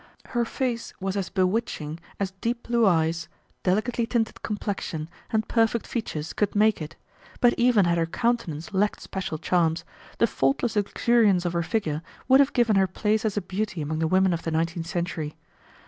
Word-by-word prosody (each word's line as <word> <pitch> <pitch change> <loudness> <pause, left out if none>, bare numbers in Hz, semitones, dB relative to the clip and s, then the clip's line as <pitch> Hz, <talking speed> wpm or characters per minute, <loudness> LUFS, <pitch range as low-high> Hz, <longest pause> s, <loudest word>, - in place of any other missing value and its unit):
Her 240 -2 +1
face 240 -1 -3
was 190 0 -2
as 195 -2 -2
bewitching 185 -5 -1 0.2
as 195 -1 -1
deep 235 +1 -1
blue 235 -2 +3
eyes, 165 -2 +1 0.3
delicately 230 +5 +1
tinted 230 -2 -1
complexion, 200 -7 -3 0.2
and 220 -1 0
perfect 225 0 +2
features 160 -10 -4
could 210 -1 0
make 215 -2 +3
it, 155 - -6 0.4
but 245 -2 +5
even 240 -5 +4
had 170 0 +2
her 165 - +1
countenance 205 -5 -1
lacked 205 +2 +1
special 185 -5 -4
charms, 165 0 +1 0.3
the - - +4
faultless 175 - 0
luxuriance 205 -2 +3
of 175 - 0
her 170 - +1
figure 165 -4 -1 0.3
would 265 +1 +7
have 280 0 +4
given 230 -5 +3
her 190 -1 +4
place 210 +4 0
as 215 -1 -1
a - - +2
beauty 190 0 -3
among 155 +1 -2
the 160 - +1
women 185 +1 +3
of 170 - -2
the - - -3
nineteenth 165 +1 -1
century. 165 -3 -3
195 Hz, 180 wpm, -26 LUFS, 165-225 Hz, 0.4 s, would